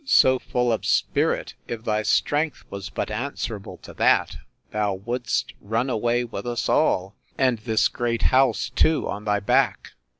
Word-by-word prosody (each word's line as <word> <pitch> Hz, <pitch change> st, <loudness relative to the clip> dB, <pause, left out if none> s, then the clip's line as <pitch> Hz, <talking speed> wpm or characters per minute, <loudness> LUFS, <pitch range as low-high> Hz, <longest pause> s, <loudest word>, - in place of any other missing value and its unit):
so 130 Hz, -, +5 dB
full 125 Hz, -1 st, 0 dB
of 110 Hz, -, -2 dB
spirit! -, -, +1 dB
if 115 Hz, -1 st, -5 dB
thy 110 Hz, -1 st, 0 dB
strength 145 Hz, +6 st, 0 dB
was 100 Hz, -1 st, -6 dB
but -, -, -4 dB
answerable 110 Hz, -3 st, -4 dB
to -, -, -12 dB
that, -, -, +2 dB, 0.4 s
thou 105 Hz, -2 st, 0 dB
would'st 120 Hz, +5 st, -2 dB
run 115 Hz, +6 st, -1 dB
away 120 Hz, +1 st, +1 dB
with 115 Hz, -2 st, -6 dB
us 120 Hz, -1 st, -2 dB
all, 95 Hz, +2 st, +1 dB, 0.2 s
and 130 Hz, -4 st, +2 dB
this 110 Hz, 0 st, +2 dB
great 120 Hz, -1 st, -2 dB
house 130 Hz, -1 st, +3 dB
too 160 Hz, +5 st, +2 dB
on 105 Hz, +1 st, -5 dB
thy 105 Hz, -1 st, +1 dB
back! 100 Hz, -, +1 dB
115 Hz, 160 wpm, -24 LUFS, 105-125 Hz, 0.4 s, so